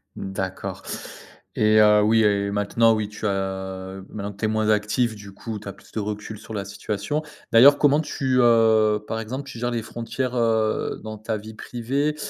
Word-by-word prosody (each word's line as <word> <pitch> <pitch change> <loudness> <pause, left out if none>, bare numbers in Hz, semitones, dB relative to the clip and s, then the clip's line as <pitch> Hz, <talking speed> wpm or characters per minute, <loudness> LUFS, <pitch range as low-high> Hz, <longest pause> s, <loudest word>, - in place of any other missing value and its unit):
D'accord 95 -1 -5 0.7
et 110 0 +5
heu, 105 0 +6
oui 110 +1 +4
et 100 -1 +2
maintenant, 105 +3 +3
oui, 105 -1 -2
tu 105 +1 -7
as 95 -1 -3
maintenant 100 -1 -5
que 100 - -17
tu 110 - -1
es - - +2
moins 110 0 0
actif, 110 +2 +1
du 100 -1 -11
coup, 110 +2 -6
tu 100 - -12
as 100 - -5
plus - - -20
de - - -3
recul 105 0 -5
sur 110 - -10
la 100 -2 -2
situation. 105 +7 -3 0.3
D'ailleurs, 135 +5 +8
comment 145 0 +4
tu, 135 -4 -1
heu, 110 -3 +4
par 110 - -3
exemple, 125 +5 -5
tu 120 - -8
gères 120 +1 -1
les 120 -1 -1
frontières, 120 +3 -4
heu, 110 -2 0
dans 110 0 -6
ta 110 +1 -3
vie 110 +1 -10
privée 135 +7 -2
110 Hz, 195 wpm, -24 LUFS, 105-115 Hz, 0.7 s, D'ailleurs